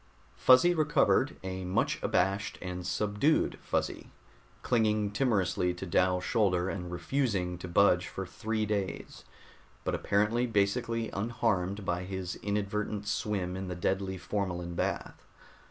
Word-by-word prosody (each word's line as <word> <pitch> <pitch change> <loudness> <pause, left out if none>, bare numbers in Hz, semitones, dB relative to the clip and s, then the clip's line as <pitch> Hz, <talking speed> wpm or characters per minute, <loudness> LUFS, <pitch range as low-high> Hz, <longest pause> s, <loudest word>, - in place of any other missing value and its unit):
Fuzzy 130 +8 +6
recovered, 150 -3 +2
a 95 0 -4
much 90 +1 0
abashed 100 +4 0
and 90 -1 -5
subdued 105 +9 +1
Fuzzy, - - -2 0.5
clinging 110 -3 +2
timorously 95 -6 +1
to 90 - -6
Dal's 90 +1 +2
shoulder 95 -4 +1
and 90 -2 -5
refusing 90 -1 -1
to 90 - -6
budge 90 0 +4
for 95 - -5
three 110 +3 -2
days, 100 -3 -3 0.6
but - - -1
apparently 110 +5 +1
basically 115 +2 0
unharmed 100 -3 -1
by 90 0 -1
his 95 -1 -4
inadvertent 105 0 -2
swim 100 -3 -1
in 95 0 -4
the 90 - -4
deadly 95 +2 -1
formalin 90 -2 -3
bath. - - -3
100 Hz, 125 wpm, -30 LUFS, 90-110 Hz, 0.6 s, Fuzzy